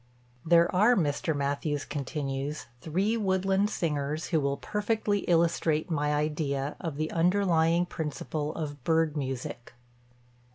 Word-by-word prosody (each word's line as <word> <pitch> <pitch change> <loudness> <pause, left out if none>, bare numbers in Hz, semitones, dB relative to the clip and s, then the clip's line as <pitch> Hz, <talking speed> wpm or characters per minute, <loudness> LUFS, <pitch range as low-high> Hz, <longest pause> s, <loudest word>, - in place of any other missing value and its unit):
"There 170 +1 +4
are," 215 +6 +5
Mr. 155 -3 0
Mathews 145 +1 -1
continues, 140 0 -3
"three 190 - 0
woodland 195 0 +1
singers 150 -2 -2
who 160 -4 +2
will 140 0 0
perfectly 210 -1 0
illustrate 165 -1 +2
my 150 -1 +1
idea 145 -2 -1
of 165 -4 -4
the 155 +1 -2
underlying 170 -1 +3
principle 155 -2 -4
of 145 -4 -5
bird 160 -1 +2
music. 130 -4 -4
155 Hz, 120 wpm, -28 LUFS, 145-175 Hz, -, are